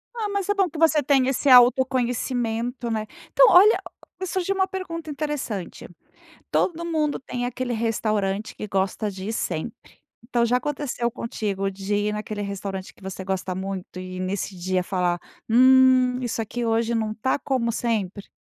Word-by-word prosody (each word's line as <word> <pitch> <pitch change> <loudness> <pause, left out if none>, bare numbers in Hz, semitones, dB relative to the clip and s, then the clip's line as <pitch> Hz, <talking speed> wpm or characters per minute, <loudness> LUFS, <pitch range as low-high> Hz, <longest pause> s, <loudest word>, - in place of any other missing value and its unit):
Ah, 435 -3 -2
mas 400 -2 -2
é 410 - +2
bom 390 -3 +1
que 325 - -9
você 320 -1 +4
tenha 270 -2 +3
esse 275 +1 0
autoconhecimento, 245 -1 +3
né, 215 -1 -2 0.2
então, - - +7
olha, 410 +5 +7 0.4
surgiu 375 +1 -1
uma 380 0 +2
pergunta 335 -4 -6
interessante: 290 - -4 0.6
todo 340 -1 0
mundo 310 -3 0
tem 245 -2 -5
aquele 250 0 -3
restaurante 215 -3 -1
que - - -6
gosta 195 +2 -1
de 190 +1 -7
ir - - -2
sempre, 185 0 -4 0.3
então 235 -1 +1
já 240 +1 +2
aconteceu 260 -3 -2
contigo 200 -4 -3
de 195 +1 -3
ir 205 +1 0
naquele 210 0 -4
restaurante 195 -1 -5
que - - -21
você 190 0 -6
gosta 190 -1 -2
muito 190 -1 -5
e 185 0 -7
nesse 185 0 -3
dia 185 +1 0
falar: 180 -2 0 0.3
"Hum 255 +1 +5
isso 235 -2 -2
aqui 235 +2 -3
hoje 230 +1 +1
não 220 -1 -1
está 225 +4 0
como 260 -4 -1
sempre?". 210 -4 -2
235 Hz, 165 wpm, -24 LUFS, 200-265 Hz, 0.6 s, então